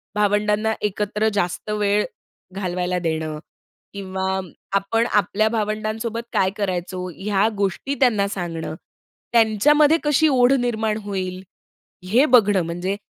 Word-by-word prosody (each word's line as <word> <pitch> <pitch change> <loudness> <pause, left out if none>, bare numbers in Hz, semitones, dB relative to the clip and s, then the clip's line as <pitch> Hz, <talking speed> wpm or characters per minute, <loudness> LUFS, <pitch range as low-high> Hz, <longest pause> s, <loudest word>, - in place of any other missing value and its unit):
भावंडांना 210 +1 +1
एकत्र 210 +1 -1
जास्त 180 0 -2
वेळ 210 0 +1 0.5
घालवायला 180 -1 -2
देणं 160 -2 -3 0.5
किंवा 190 -1 -3 0.4
आपण 210 +4 +1
आपल्या 210 +1 +2
भावंडांसोबत 215 +1 -2
काय 190 - +3
करायचो, 185 -2 -3
ह्या 200 +1 +1
गोष्टी 200 +8 -1
त्यांना 220 -7 +3
सांगणं. 170 -5 -4 0.6
त्यांच्यामध्ये 285 +8 +4
कशी 295 +1 +3
ओढ 255 -3 +4
निर्माण 220 -3 -1
होईल, 185 -2 -4 0.7
हे 240 +9 +4
बघणं 205 -5 +5
म्हणजे 175 +4 -3
205 Hz, 110 wpm, -22 LUFS, 185-220 Hz, 0.7 s, बघणं